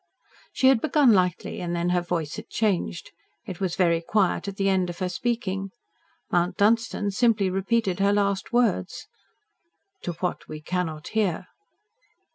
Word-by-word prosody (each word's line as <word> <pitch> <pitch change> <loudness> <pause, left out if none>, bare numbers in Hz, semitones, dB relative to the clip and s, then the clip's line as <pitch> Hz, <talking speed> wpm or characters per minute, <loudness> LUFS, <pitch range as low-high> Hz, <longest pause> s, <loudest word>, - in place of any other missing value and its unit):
She 260 - +4
had 260 -4 +4
begun 285 -5 +4
lightly, 180 -3 0
and 175 -1 -2
then 170 +1 0
her 180 0 +2
voice 170 -4 -3
had - - -9
changed. 195 -5 -1 0.3
It 190 -6 -7
was 185 -3 -1
very 170 -3 +2
quiet 195 +2 0
at 200 - -4
the 195 0 0
end 190 -2 +2
of 175 - -6
her 185 0 -2
speaking. 195 -2 -2 0.6
Mount 175 +1 +1
Dunstan 215 -1 +2
simply 210 -3 +2
repeated 195 0 0
her 200 +1 +3
last 200 -1 0
words. 240 -1 0 1.0
"To 175 - -4
what 180 +2 -4
we 155 - -7
cannot 160 -1 -3
hear." 200 -5 -1
190 Hz, 155 wpm, -25 LUFS, 175-215 Hz, 1.0 s, She